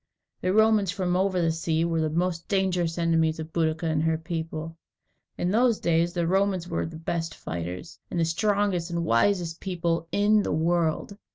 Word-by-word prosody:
The 185 - +1
Romans 215 -1 +4
from 180 -2 -1
over 190 0 +1
the 165 -2 +2
sea 160 0 0
were 165 -1 0
the 155 - 0
most 170 +1 -1
dangerous 180 -4 0
enemies 165 -1 +1
of 160 0 -7
Boadicea 160 -1 0
and 155 -1 +1
her 160 0 +1
people. 160 0 -5 0.6
In 175 - 0
those 235 +1 +3
days 170 0 +2
the 175 -1 -1
Romans 190 0 +1
were 165 -2 -2
the 160 -1 -8
best 165 0 -3
fighters, 90 - -6
and 175 - -2
the 165 - +3
strongest 200 0 0
and 170 -1 -2
wisest 165 - +1
people 170 -3 -2
in 210 +1 +3
the - - -2
world. 165 +3 0
170 Hz, 180 wpm, -26 LUFS, 160-185 Hz, 0.6 s, Romans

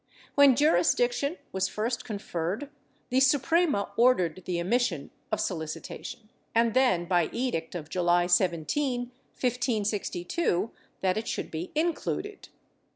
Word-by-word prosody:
When 280 -3 +6
jurisdiction 325 - +2
was 190 0 0
first 225 +4 -2
con 215 -3 -4
ferred, 195 - -3 0.4
the 255 - +4
Suprema 280 - +2
ordered 185 -8 +3
the 175 -2 -1
omission 185 - 0 0.2
of 215 - 0
solicitation 190 +3 -5 0.3
and 230 -1 +3
then, 245 -10 +3
by 175 -2 +2
edict 230 -10 -2
of 155 -4 -5
July 175 +1 +2
17, 180 - +1 0.4
1562, 220 - -1 0.3
that 190 +1 +1
it 220 - -3
should - - -3
be 165 +3 -5
included. 345 +5 -2
215 Hz, 120 wpm, -28 LUFS, 175-260 Hz, 0.4 s, When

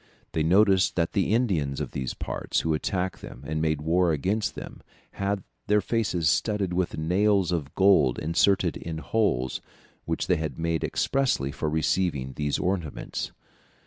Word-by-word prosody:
They 80 - -1
noticed 95 +3 +4
that 85 -2 +1
the 100 0 0
Indians 90 - +1
of - - -4
these 65 -2 -4
parts - - -2
who 80 - 0
attacked 90 +3 -2
them 60 - -10
and 80 +1 -2
made 80 -2 0
war 85 +2 +3
against 95 +9 -1
them, - - -9 0.3
had 100 -1 -2 0.2
their 105 0 +4
faces 100 -6 0
studded 100 +2 +1
with 90 0 -1
nails 95 +3 +2
of 75 -5 -3
gold 95 -10 +4
inserted 85 +2 +2
in 80 -1 -6
holes 75 - 0 0.4
which - - -1
they - - +2
had 80 -4 -4
made 80 -2 -1
expressly 130 - 0
for 75 - -2
receiving 80 -4 0
these 75 -1 -1
ornaments. 90 -6 -3
85 Hz, 155 wpm, -26 LUFS, 75-100 Hz, 0.4 s, noticed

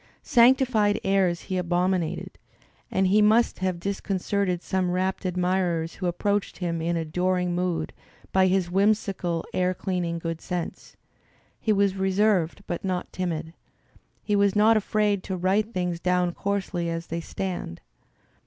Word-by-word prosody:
Sanctified 235 -4 +4
airs 190 -3 +2
he 185 - -3
abominated, 180 -1 -1 0.5
and 190 - +1
he 200 +3 +4
must 220 +3 +3
have 185 -2 -1
discon 195 +2 -3
certed 185 -2 -1
some 185 -1 0
rapt 185 +2 -1
admirers 180 -2 0
who 185 - -3
approached 200 +3 -1
him 170 -3 -2
in 170 +1 0
adoring 180 +2 0
mood, 175 -3 -1 0.4
by 190 0 +4
his 185 -2 +1
whimsical 195 -4 +1
air 185 0 +1
dearing 175 -3 -2
good 165 -1 -4
sense. 180 -2 -5 0.6
He 220 - 0
was 200 -2 +2
re 190 0 0
^ - - -3
served 200 -3 +2
but 175 - -4
not 185 -2 -3
timid. 165 -3 -3 0.7
He 210 - 0
was 200 -1 +3
not 215 +2 +5
afraid 210 -1 +1
"to 190 - -3
write 195 +5 +1
things 180 -4 -2
down 180 0 +1
coarsely 190 -4 -2
as 165 0 -3
they 165 0 -4
stand." 175 - -5
185 Hz, 150 wpm, -25 LUFS, 175-200 Hz, 0.7 s, not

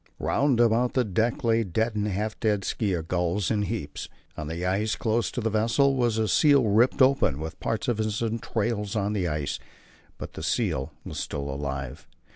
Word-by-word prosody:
Round 140 -4 +1
about 120 +1 +3
the 130 - +3
deck 115 +6 0
lay 115 -1 +3
dead 110 +4 -1
and 105 0 0
half 105 +2 -2
dead 105 -3 +1
skua 95 -7 -1
gulls 90 +3 0
in 105 -2 +1
heaps. 100 -8 -4 0.3
On 75 - -5
the 85 +3 -4
ice 105 +4 0
close 115 0 0
to 125 - -4
the 110 0 0
vessel 115 +6 +3
was 120 -4 +1
a 110 -1 +1
seal 140 - +5
ripped 115 +6 +4
open, 130 - +3
with 80 +1 -6
part 115 -1 -2
of 120 -3 0
its 110 -1 -1
entrails 115 -2 -2
on 105 0 0
the 95 -4 0
ice; 75 -3 -2 0.6
but - - -8
the - - -7
seal 65 0 -1
was - - -5
still 70 -1 -4
alive. 70 0 -5
105 Hz, 190 wpm, -26 LUFS, 90-115 Hz, 0.6 s, seal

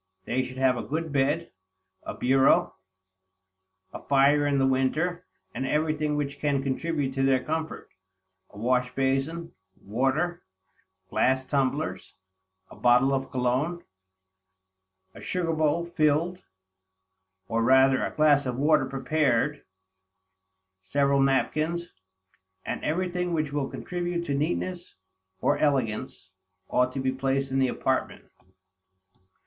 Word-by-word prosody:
They 130 +2 0
should 130 0 -7
have 130 -1 +2
a - - -2
good 160 +4 -3
bed, 145 +5 0 0.5
a - - -7
bureau, 130 +2 +3 1.2
a - - -7
fire 145 +1 +3
in 140 -1 +1
the 135 - +3
winter, 155 +7 0 0.3
and - - -3
everything 150 +1 0
which 145 -1 -3
can 140 -2 0
contribute 140 0 -2
to 135 - -2
their 135 -1 +2
comfort; 160 +1 -4 0.6
a - - -16
wash 125 +2 0
basin, 135 +5 -1 0.3
water, 135 - -1 0.7
glass 130 +1 +2
tumblers, 140 +2 -2 0.6
a - - -11
bottle 125 +3 +4
of 135 0 -2
cologne, 130 +8 -1 1.3
a - - -12
sugar 175 -3 -1
bowl 155 +2 +1
filled, 170 +1 +1 1.1
or 115 +1 0
rather 130 +2 +4
a - - -1
glass 145 -2 +4
of 125 -1 -3
water 145 -1 +3
prepared, 140 0 0 1.2
several 140 +9 +1
napkins, 155 +5 0 0.8
and - - -4
everything 180 +2 -1
which 155 -3 -2
will 145 -2 -1
contribute 175 -1 -4
to 145 - -2
neatness, 175 +5 -2 0.5
or - - +2
elegance, 120 -8 -1 0.4
ought 125 0 +2
to 135 - -4
be 130 0 0
placed 135 +1 -1
in 135 - +1
the 130 - +3
apartment. - - -2
140 Hz, 120 wpm, -26 LUFS, 130-155 Hz, 1.3 s, bottle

